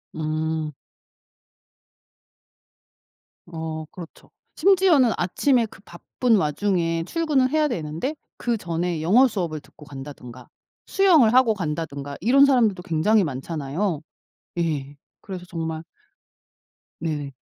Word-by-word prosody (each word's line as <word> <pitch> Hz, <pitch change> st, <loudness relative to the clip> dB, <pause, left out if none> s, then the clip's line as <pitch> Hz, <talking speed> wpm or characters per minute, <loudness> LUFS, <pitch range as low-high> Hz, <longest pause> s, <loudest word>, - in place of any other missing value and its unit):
음. 155 Hz, 0 st, -2 dB, 2.8 s
어 160 Hz, -2 st, -5 dB
그렇죠. 170 Hz, -3 st, -12 dB, 0.3 s
심지어는 355 Hz, -, +4 dB
아침에 240 Hz, +7 st, +2 dB
그 205 Hz, -, -14 dB
바쁜 225 Hz, +7 st, -1 dB
와중에 165 Hz, 0 st, 0 dB
출근을 295 Hz, -, +1 dB
해야 305 Hz, 0 st, +2 dB
되는데 170 Hz, -, -3 dB, 0.2 s
그 235 Hz, -2 st, -1 dB
전에 170 Hz, -2 st, -2 dB
영어 220 Hz, +12 st, +5 dB
수업을 175 Hz, -9 st, -3 dB
듣고 150 Hz, -, -17 dB
간다든가 135 Hz, -3 st, -10 dB, 0.4 s
수영을 320 Hz, -, +4 dB
하고 255 Hz, -3 st, +5 dB
간다든가 150 Hz, -6 st, -4 dB
이런 270 Hz, +6 st, +6 dB
사람들도 225 Hz, -9 st, +2 dB
굉장히 190 Hz, +6 st, +2 dB
많잖아요. 150 Hz, +4 st, -3 dB, 0.6 s
예 145 Hz, -4 st, -2 dB, 0.2 s
그래서 185 Hz, -3 st, -8 dB
정말 160 Hz, -2 st, -4 dB, 1.2 s
네. 145 Hz, -4 st, -3 dB
170 Hz, 235 characters per minute, -23 LUFS, 155-235 Hz, 2.8 s, 이런